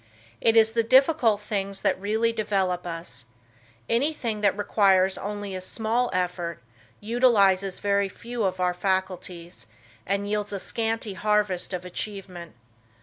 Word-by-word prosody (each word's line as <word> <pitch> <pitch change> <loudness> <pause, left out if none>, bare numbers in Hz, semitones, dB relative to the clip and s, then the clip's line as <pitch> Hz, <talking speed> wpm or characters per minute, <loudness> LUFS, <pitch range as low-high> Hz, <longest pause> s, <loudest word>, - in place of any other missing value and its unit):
It 225 0 +4
is 220 0 +6
the 230 0 +2
difficult 255 -3 +4
things 200 -2 -3
that - - 0
really 220 +3 +1
develop 190 -5 -1
us, 165 -6 -5 0.6
anything 235 -4 0
that 200 -1 +2
requires 195 -2 +3
only 205 -1 -5
a 185 - -4
small 225 +5 -1
effort, 180 -2 -2 0.4
utilizes 200 -5 +3
very 200 -1 +1
few 235 +4 -6
of 185 -1 -1
our 180 -1 +1
faculties, 180 - -3 0.4
and 200 +1 -1
yields 210 0 -2
a 200 - -3
scanty 225 0 -2
harvest 210 -3 0
of 180 -1 -4
achievement. 180 -3 -6
200 Hz, 135 wpm, -25 LUFS, 185-225 Hz, 0.6 s, is